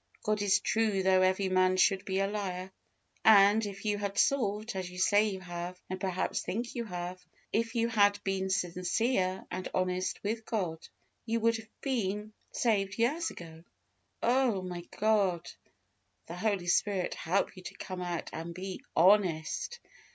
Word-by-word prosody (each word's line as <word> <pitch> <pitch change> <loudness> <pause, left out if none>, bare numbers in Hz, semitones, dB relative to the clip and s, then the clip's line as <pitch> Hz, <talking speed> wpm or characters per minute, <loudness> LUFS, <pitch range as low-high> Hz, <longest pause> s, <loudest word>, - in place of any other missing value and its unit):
God 215 -1 0
is 200 -2 +3
true 215 -4 +1
though 185 0 +4
every 190 +1 +2
man 185 0 +3
should 195 +1 +3
be 190 0 0
a - - +2
liar; 190 -2 -4 0.5
and, 210 0 +7
if 200 0 -6
you 205 -1 0
had 200 -1 -3
sought, 215 -5 +1
as 185 -1 -3
you 180 - -11
say 205 +3 +4
you 190 -2 -5
have, 175 0 -6
and 185 0 -4
perhaps, 185 -2 -1
think 235 +4 -3
you 235 -1 -3
have; 180 -2 -6 0.3
if 225 +1 0
you 230 0 +2
had 205 -3 +4
been 190 -1 -1
sincere 185 +2 0
and 185 0 -3
honest 185 0 -1
with 220 +2 -2
God, 180 -8 -3 0.4
you 230 +1 +1
would 230 0 +3
have 220 0 -15
been 215 -5 -2 0.2
saved 195 -4 0
years 300 +9 +1
ago. 165 -1 -11 0.6
Oh! 240 -5 +2
may 175 -1 -6
God, 200 -5 +1 0.7
the 170 - -7
Holy 200 -1 -1
Spirit, 185 +1 +1
help 185 +6 -1
you 185 - -10
to - - -9
come 185 -1 -6
out 175 -2 -4
and 165 +1 -6
be 185 +1 -6 0.2
HONEST. 185 - +3
195 Hz, 165 wpm, -31 LUFS, 185-215 Hz, 0.7 s, and